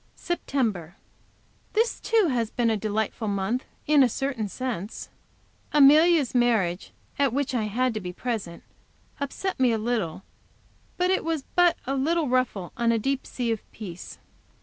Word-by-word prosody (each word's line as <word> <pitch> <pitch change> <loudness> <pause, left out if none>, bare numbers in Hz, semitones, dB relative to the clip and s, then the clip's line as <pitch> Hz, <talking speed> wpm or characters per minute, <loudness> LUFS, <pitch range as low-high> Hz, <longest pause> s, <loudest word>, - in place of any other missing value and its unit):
September. 220 - -2 0.8
This, 455 +2 +1
too, 440 -7 +2
has 235 -4 0
been 235 -1 +1
a - - +2
delightful 215 +1 -2
month 200 +5 -1 0.2
in 300 -1 +5
a 255 - +5
certain 255 -3 -2
sense. 230 -4 -5 0.6
Amelia's 300 0 +6
marriage, 220 -8 +1 0.3
at 280 -3 +3
which 275 +1 -1
I 230 -4 0
had 245 +4 0
to 215 - -3
be 180 -1 -5
present, 195 -4 -4 0.6
upset 285 +6 -3
me 255 -2 +4
a 225 - +1
little, 215 -7 -2 0.7
but 360 +1 +2
it 380 - +1
was 320 -4 -2
but 355 -1 +5
a 270 - -1
little 315 +3 +1
ruffle 245 -8 0
on 235 -1 +2
a 230 - +2
deep 270 +4 -2
sea 240 -2 -2
of 225 - -2
peace. 185 -5 -9
245 Hz, 155 wpm, -26 LUFS, 215-280 Hz, 0.8 s, Amelia's